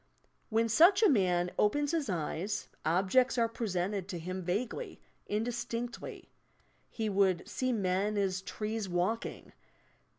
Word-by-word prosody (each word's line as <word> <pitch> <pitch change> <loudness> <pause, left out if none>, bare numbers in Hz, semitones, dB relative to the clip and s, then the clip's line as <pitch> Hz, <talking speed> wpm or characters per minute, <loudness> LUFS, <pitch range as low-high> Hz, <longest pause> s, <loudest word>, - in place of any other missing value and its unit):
When 225 0 +2
such 345 - +6
a 430 - +7
man 180 -7 +2
opens 290 +7 +2
his 320 -7 -1
eyes, 175 +3 -2
objects 195 +11 +3
are 230 -1 +3
presented 195 -4 -2
to 190 -3 -4
him 185 +3 -4
vaguely, 215 - -3 0.3
indistinctly. 235 +2 -4 0.6
He 220 -2 -3
would 195 -3 +2
"see 255 0 -1
men 200 -1 0
as 190 -2 0
trees 215 0 -4
walking." 180 +6 -2
210 Hz, 125 wpm, -32 LUFS, 185-235 Hz, 0.6 s, a